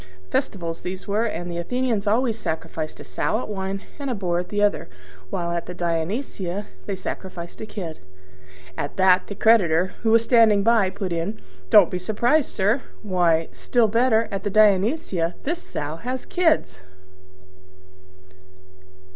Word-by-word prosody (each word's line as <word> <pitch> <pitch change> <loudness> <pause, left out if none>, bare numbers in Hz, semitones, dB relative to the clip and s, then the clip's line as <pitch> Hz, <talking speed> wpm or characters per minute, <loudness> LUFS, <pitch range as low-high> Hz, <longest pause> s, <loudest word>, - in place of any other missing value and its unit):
(Festivals 170 - -2
these 185 +1 -6
were: 210 +3 +1
and 175 -5 -4
the 170 - -3
Athenians 230 +1 -1
always 230 +2 +2
sacrifice 160 -5 -4
a - - -8
sow 215 - -1
at - - -5
one, 195 -1 -4 0.2
and 280 -1 -3
a 250 - -1
boar 175 -4 -1
at 180 - -5
the 205 - -2
other; 205 - +1 0.4
while 170 - -2
at 170 0 -3
the 180 - -6
Dionysia 180 - -2 0.2
they 200 - -2
sacrifice 185 -2 -7
a 220 - -6
kid.) 175 -7 -6 0.8
At 145 - -4
that 185 -1 +4
the 200 - -6
creditor, 185 -6 +3
who 225 - +1
was 230 +1 +5
standing 225 -4 +5
by, 225 -3 +4
put 190 -2 -4
in, 170 +6 -3 0.3
"Don't 200 -5 +7
be 180 - -2
surprised, 240 +10 +1
sir; 210 +6 +1 0.2
why, 175 -5 +2
still 240 -3 +1
better, 230 0 +3
at 195 -1 -3
the 205 - -1
Dionysia 200 - +2
this 340 +5 -2
Sow 150 - -5
has 250 +7 -4
kids!" 205 - +1
200 Hz, 155 wpm, -23 LUFS, 175-225 Hz, 0.8 s, Don't